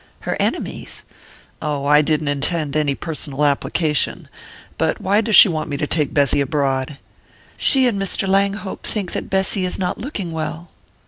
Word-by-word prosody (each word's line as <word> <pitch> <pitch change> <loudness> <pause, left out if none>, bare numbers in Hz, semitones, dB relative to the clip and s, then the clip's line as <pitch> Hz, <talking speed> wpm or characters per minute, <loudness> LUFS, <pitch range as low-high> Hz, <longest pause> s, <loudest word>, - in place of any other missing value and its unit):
"Her - - -2
enemies?" - - -3 0.6
"Oh, 145 -2 -2
I 150 +1 +5
didn't 155 0 0
intend 145 +1 -1
any 150 -2 +1
personal 150 -3 -3
application. 150 +1 0 0.5
But - - 0
why 200 +3 +2
does 220 -2 +2
she 205 - +11
want 160 -4 -3
me 145 - -3
to 150 - -1
take 150 -1 0
Bessy 140 -1 +2
abroad?" 140 -1 -1 0.6
"She 265 -2 +3
and 215 -5 0
Mr. 195 0 -1
Langhope 195 +1 0
think 200 -5 -1
that - - -4
Bessy 190 0 0
is 180 - -2
not 180 -1 -2
looking 210 - -5
well." 160 +1 -5
160 Hz, 165 wpm, -20 LUFS, 145-190 Hz, 0.6 s, she